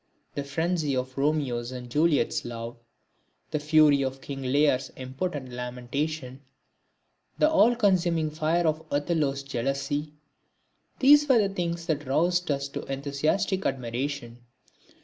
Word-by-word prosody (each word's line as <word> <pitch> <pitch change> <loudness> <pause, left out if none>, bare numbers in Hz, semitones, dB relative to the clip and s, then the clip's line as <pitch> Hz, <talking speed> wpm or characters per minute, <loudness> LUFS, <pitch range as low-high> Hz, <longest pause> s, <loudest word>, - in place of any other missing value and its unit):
The 140 - -3
frenzy 155 0 -1
of 130 0 -3
Romeo's 135 -5 0
and 125 -1 -7
Juliet's 145 0 +1
love, 115 0 -6 0.8
the 150 - 0
fury 150 -2 +5
of 135 0 -2
King 135 0 -7
Lear's 135 0 +2
impotent 130 +1 -4
lamentation, 125 +3 -4 1.0
the 305 - +4
all 245 -7 +4
consuming 175 -8 +2
fire 160 +3 +1
of 160 0 0
Othello's 145 -2 0
jealousy, 140 +3 -2 0.8
these 290 +2 +6
were 260 - +6
the 195 - -7
things 170 -2 -2
that 150 -4 -2
roused 175 +6 +1
us 140 -1 0
to - - -5
enthusiastic 145 +8 0
admiration. 125 -1 -3
145 Hz, 125 wpm, -27 LUFS, 130-165 Hz, 1.0 s, these